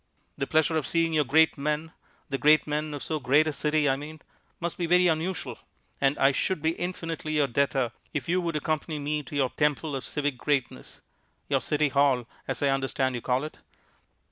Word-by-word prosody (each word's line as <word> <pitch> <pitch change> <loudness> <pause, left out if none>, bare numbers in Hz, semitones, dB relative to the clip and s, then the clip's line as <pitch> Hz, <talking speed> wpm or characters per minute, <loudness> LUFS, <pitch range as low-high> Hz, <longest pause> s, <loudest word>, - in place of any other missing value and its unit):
The 135 - -3
pleasure 160 +1 +2
of 155 - -1
seeing 165 -1 +1
your 155 -1 +3
great 160 +3 +4
men 150 +3 -2 0.4
the 135 - -3
great 150 +1 +5
men 150 0 -2
of 140 - -6
so 155 -1 -2
great 145 +4 +3
a 155 - -1
city, 150 0 +1
I 135 - +3
mean 155 +2 -8 0.4
must 170 0 -3
be 170 - 0
very 180 +1 +5
unusual, 160 -6 -1 0.4
and 140 +1 +3
I 135 - +5
should 185 +5 -1
be 160 +2 +1
infinitely 165 -3 -4
your 150 -2 +3
debtor 135 -1 0 0.2
if 150 -4 -3
you 180 +2 +2
would 170 -2 -2
accompany 155 +1 -2
me 150 +1 -2
to 145 +1 -10
your 135 -3 +1
temple 150 0 0
of 135 - -4
civic 145 -4 -2
greatness 140 -3 -2 0.5
your - - +2
City 150 0 +1
Hall, 140 -3 +2 0.2
as - - -2
I 140 - +3
understand 135 -1 0
you 120 - -4
call 125 +3 0
it. 155 - -8
150 Hz, 200 wpm, -27 LUFS, 140-160 Hz, 0.5 s, great